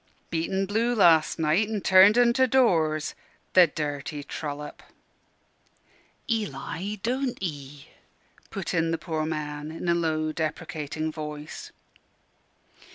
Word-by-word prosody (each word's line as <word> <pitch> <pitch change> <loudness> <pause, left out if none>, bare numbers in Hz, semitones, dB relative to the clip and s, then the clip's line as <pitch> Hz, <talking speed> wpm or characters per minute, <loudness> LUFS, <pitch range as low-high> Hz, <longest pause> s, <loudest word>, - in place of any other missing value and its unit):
"Beat 165 0 -1
en 195 0 0
blue 225 +5 0
las' 165 -7 +4
night, 165 +7 +2
an' 215 -2 -2
turned 190 +4 +6
en 240 -1 +5
to 260 0 +3
doors 165 - +2 0.4
the 180 -2 +7
dirty 145 -1 -4
trollop." 150 0 -6 1.5
"Eli, 200 - -3
don't 255 +2 -1
'ee 145 -4 -6 0.3
" - - -32
put 195 -3 -4
in 165 -1 +1
the 165 - 0
poor 155 -1 -3
man, 150 -1 -4
in 165 +2 -6
a 170 - +4
low, 155 -2 0
deprecating 155 -1 -3
voice. 150 -1 -7
160 Hz, 125 wpm, -26 LUFS, 150-195 Hz, 1.5 s, the